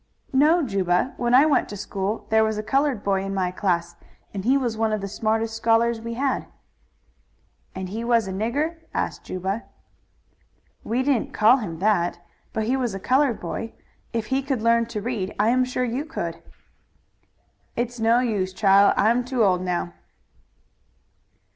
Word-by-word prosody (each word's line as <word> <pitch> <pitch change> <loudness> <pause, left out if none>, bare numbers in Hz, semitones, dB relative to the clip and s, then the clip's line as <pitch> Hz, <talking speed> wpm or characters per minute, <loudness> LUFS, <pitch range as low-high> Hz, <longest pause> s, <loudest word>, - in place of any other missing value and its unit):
"No; 310 +5 +4
Juba, 195 0 0
when 240 0 +2
I 275 +4 +7
went 310 - +2
to 205 - -6
school 200 +2 -3
there 220 0 +5
was 220 -1 0
a 215 - -3
colored 270 0 0
boy 195 -1 +1
in 195 0 -4
my 185 -2 0
class, 175 -2 -1 0.4
and 195 -2 -4
he 260 +5 +3
was 245 -4 -1
one 220 0 0
of 215 - 0
the 200 - -4
smartest 220 +2 -1
scholars 225 0 +2
we 230 0 -5
had." 270 +2 -1 1.3
"And 190 0 -4 0.2
was 230 -3 +3
he 190 - -5
a - - -5
nigger?" 285 - -1 0.2
asked - - -3
Juba. 190 +5 -3 1.2
"We 245 +3 0
didn't 265 -4 0
call 225 +5 +6
him 180 -10 -5
that, 180 -2 +1 0.3
but 220 - -2
he 245 +5 +1
was 245 -6 -1
a - - -5
colored 260 +2 +2
boy. 225 +6 -5 0.4
If 230 -2 -2
he 270 - +2
could 265 -4 -2
learn 230 0 +3
to 225 -3 -4
read 215 -5 -3
I 210 +2 +4
am 255 +2 +3
sure 255 0 -2
you 250 +4 -2
could." 320 +1 -5 1.3
"It's 240 0 -3
no 230 +2 +3
use, 200 -6 -1
chile. 200 0 +5
I'm 235 +4 +3
too 250 -2 0
old 185 -3 +3
now." 175 - -2
225 Hz, 175 wpm, -24 LUFS, 195-250 Hz, 1.3 s, I